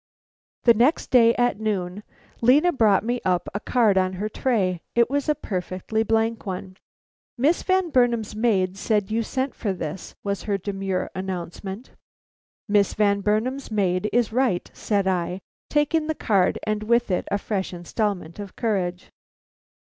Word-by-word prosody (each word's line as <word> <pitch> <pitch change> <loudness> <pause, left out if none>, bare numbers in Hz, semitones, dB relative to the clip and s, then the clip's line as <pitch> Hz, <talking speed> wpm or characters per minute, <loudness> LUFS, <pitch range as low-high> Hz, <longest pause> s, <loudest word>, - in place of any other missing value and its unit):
The 235 - +7
next 250 +8 +2
day 235 -2 +6
at 245 -3 +1
noon 200 -3 -2 0.4
Lena 285 +9 +5
brought 215 -7 +3
me 240 +2 -1
up 180 -1 0
a 205 - -2
card 215 -5 +3
on 185 0 0
her 200 +3 -3
tray. 195 -8 0
It 235 +1 +3
was 285 +1 0
a 300 - +3
perfectly 185 +1 -3
blank 225 +1 0
one. 185 -1 -6 0.6
"Miss 295 +8 +2
Van 375 -3 +1
Burnam's 235 -5 +2
maid 195 -5 +1
said 210 0 0
you 225 +1 +1
sent 260 +4 -2
for 205 -5 -2
this," 175 -1 -6
was 200 -1 -2
her 200 - +2
demure 195 -1 -3
announcement. 190 +4 -6 0.8
"Miss 205 -2 +2
Van 200 -1 +2
Burnam's 230 +7 -1
maid 200 -2 0
is 235 -2 +1
right," 245 -8 0
said 200 -3 0
I, 180 0 -1 0.3
taking 300 +1 +1
the 315 - -1
card 195 -8 +2
and 215 0 -1
with 235 0 +1
it 180 - -1
a 200 - +1
fresh 200 -2 -3
installment 180 0 -3
of 200 -2 -8
courage. 185 -6 -2
210 Hz, 155 wpm, -24 LUFS, 190-240 Hz, 0.8 s, The